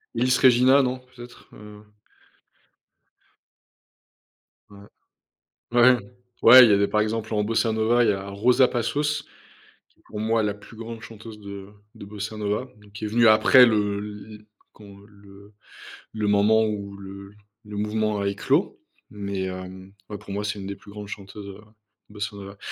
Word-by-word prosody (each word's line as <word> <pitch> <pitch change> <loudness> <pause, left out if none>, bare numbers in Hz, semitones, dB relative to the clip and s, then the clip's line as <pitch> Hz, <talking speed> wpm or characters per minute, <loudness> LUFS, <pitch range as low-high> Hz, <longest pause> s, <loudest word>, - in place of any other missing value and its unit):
Ellis 130 0 +2
Regina, 130 +2 +5
non, 130 -1 -2
peut-être, 125 -1 -15
heu? 105 0 -14 2.8
Ouais. 100 - -15 0.9
Ouais, 120 +1 +5 0.4
ouais, 125 +2 +10
il 115 - +4
y - - +5
avait, 100 0 +2
par 105 - +1
exemple, 110 +1 -3
en 105 - +1
bossa 115 +1 0
nova, 115 +2 +2
il 110 - +3
y - - +3
a 95 0 -6
Rosa 120 +6 +3
Passos, 145 +5 -2 0.7
qui - - -36
est - - -31
pour 105 - -8
moi 110 +1 0
la 105 -1 -1
plus 105 +2 -16
grande 115 0 -8
chanteuse 110 -1 -11
de 100 -1 -10 0.3
de - - -11
bossa 105 +1 -7
nova, 105 +4 -2
donc 105 -1 -20
qui 105 +1 -6
est - - -2
venue 115 +2 +3
après 110 +4 +7
le 105 -3 0
l 105 0 -8
l 105 0 -17 0.3
quand 100 -2 -15
le 100 0 -18 0.6
le 110 -1 -2
moment 105 +2 +3
où 100 -2 -5
le 100 +1 -11 0.3
le 105 0 -8
mouvement 105 0 -1
a 100 - -1
éclos, 100 0 -1 0.3
mais, 100 -2 -5
hem, 95 0 -8 0.2
ouais, 105 - -6
pour 100 - -12
moi, 100 +1 -3
c'est 105 0 -3
une 95 - -7
des 100 - -5
plus - - -18
grandes 105 0 -9
chanteuses, 100 0 -9
heu, 100 +2 -11 0.5
de - - -17
bossa 105 -1 -5
nova 100 0 -10
105 Hz, 175 wpm, -24 LUFS, 100-115 Hz, 2.8 s, ouais